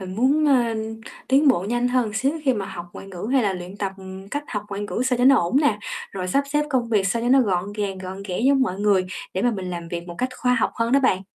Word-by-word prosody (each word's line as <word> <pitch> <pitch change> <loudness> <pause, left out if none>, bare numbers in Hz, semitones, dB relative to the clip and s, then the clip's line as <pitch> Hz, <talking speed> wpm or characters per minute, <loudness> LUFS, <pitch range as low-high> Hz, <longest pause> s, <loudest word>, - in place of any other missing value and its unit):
Mình 185 0 -7
muốn, 275 +7 +3
ơ, 245 -5 +3 0.5
tiến 280 +3 +5
bộ 245 -10 +3
nhanh 240 +1 +1
hơn 245 -4 +1
xíu 265 +7 +1
khi 260 -2 +3
mà 200 -3 -3
học 175 0 -7
ngoại - - -10
ngữ 195 +2 -6
hay 265 -2 +4
là 200 -3 +1
luyện 180 +1 -7
tập, 200 -2 -2
ừm, 190 0 -10
cách 290 +6 -3
học 210 -3 -3
ngoại 200 0 -5
ngữ 205 +3 -2
sao 255 -1 +1
cho 245 - +3
nó 270 +1 +7
ổn 175 +5 +1
nè, 235 -9 +2 0.3
rồi 185 -2 -4
sắp 275 +9 +2
xếp 295 0 +2
công 250 -4 +1
việc 205 -4 +2
sao 230 +3 -1
cho 240 - 0
nó 265 +1 +6
gọn 195 -3 0
gàng, 200 -2 -3
gọn 190 +1 -7
ghẽ 180 - -2
giống 270 +2 +4
mọi 190 -7 -1
người, 200 -3 +3 0.3
để 190 - -1
mà 245 - +3
mình 190 -5 -4
làm 170 -1 -6
việc 170 0 -5
một 175 - -7
cách 255 - 0
khoa 250 0 +2
học - - +1
hơn 230 0 -1
đó 275 - +5
bạn. 220 -8 +2
210 Hz, 285 wpm, -23 LUFS, 190-255 Hz, 0.5 s, nó